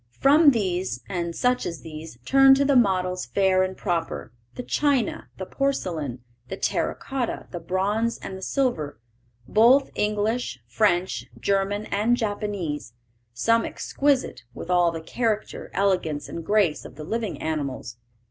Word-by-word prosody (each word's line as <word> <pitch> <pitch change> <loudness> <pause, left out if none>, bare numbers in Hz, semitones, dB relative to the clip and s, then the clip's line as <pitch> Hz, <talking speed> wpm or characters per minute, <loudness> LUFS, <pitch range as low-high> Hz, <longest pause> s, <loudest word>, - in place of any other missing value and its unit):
From 290 +3 +7
these, 185 - -1
and 170 -3 -3
such 250 0 +1
as 170 -2 -5
these, 155 -4 -9
turn 270 0 +7
to 280 +1 +2
the 280 0 +3
models 185 -5 +2
fair 190 -1 +3
and 185 0 -1
proper; 170 - -2 0.2
the 250 - -5
china, 280 -4 0
the 190 - -5
porcelain, 170 - -2 0.2
the - - -5
terra - - 0
cotta, 265 -3 -3
the 175 - -5
bronze, 200 +7 0
and 190 - -7
the 190 - -9
silver, 190 - -1 0.5
both 245 - +5
English, 210 - -1
French, 185 - +1
German, 200 +1 0
and 220 +4 +2
Japanese; 205 - -3 0.4
some 230 - +2
exquisite, 280 -2 0
with 175 - -5
all 175 -1 +4
the 165 -1 -5
character, 215 +5 -2
elegance, 180 -7 0
and 165 - -6
grace 200 -5 +2
of - - -11
the 155 - -8
living 220 +3 -3
animals. 140 -6 -3
195 Hz, 145 wpm, -25 LUFS, 165-230 Hz, 0.5 s, From